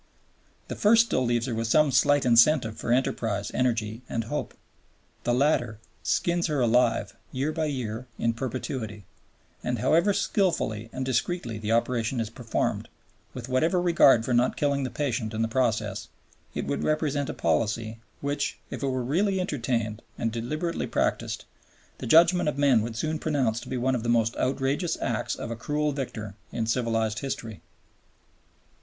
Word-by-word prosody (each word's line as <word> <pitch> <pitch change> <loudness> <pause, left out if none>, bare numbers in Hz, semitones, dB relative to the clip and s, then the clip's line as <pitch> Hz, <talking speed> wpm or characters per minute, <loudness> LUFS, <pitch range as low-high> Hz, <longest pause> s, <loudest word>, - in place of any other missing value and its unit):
The - - -5
first 225 +2 +5
still 130 - 0
leaves 120 -1 +1
her 125 - -3
with 115 0 -1
some 150 +4 +4
slight 145 +3 +4
incentive 120 -1 +5
for - - -3
enterprise, 115 -5 0
energy, 115 -3 0
and 115 - -1
hope. 145 +7 -4 0.7
The 120 - +2
latter 125 -5 +1 0.2
skins 175 0 +1
her 150 -3 -1
alive 120 0 +2 0.2
year 135 +4 -1
by 160 0 -1
year 125 -4 -4
in 115 - +1
perpetuity, 115 -4 -5 0.6
and 125 0 -1
however 165 - +3
skilfully 160 - 0
and 130 0 -4
discreetly 130 -2 -1
the 110 0 -3
operation 120 +1 0
is 110 -2 -2
performed, - - -2 0.5
with - - -6
whatever 160 +8 +2
regard 165 -9 +5
for 125 - 0
not 120 +1 +2
killing 140 -2 +1
the - - -2
patient 115 -7 -2
in 110 - 0
the - - +1
process, 110 -4 -1 0.5
it - - -2
would - - -2
represent 150 -2 0
a - - -2
policy 110 +6 0 0.2
which, 145 0 -2
if - - -5
it 140 - 0
were 130 -1 -1
really 190 +9 +1
entertained 120 - -2 0.2
and 115 - -1
deliberately 155 +9 -3
practised, - - -1 0.5
the - - -5
judgment 170 +4 +5
of 145 - -4
men 140 -5 +4
would 115 +1 -4
soon 155 +6 -2
pronounce 130 -8 0
to - - -10
be 130 - -2
one 130 +2 +1
of 125 - -1
the 120 - -2
most 115 -1 +2
outrageous 135 +6 0
acts - - -1
of - - -6
a - - -2
cruel 150 +6 -1
victor 115 -7 -5 0.2
in 115 - -2
civilized 115 -2 0
history. 115 -6 -5
125 Hz, 165 wpm, -27 LUFS, 115-145 Hz, 0.7 s, first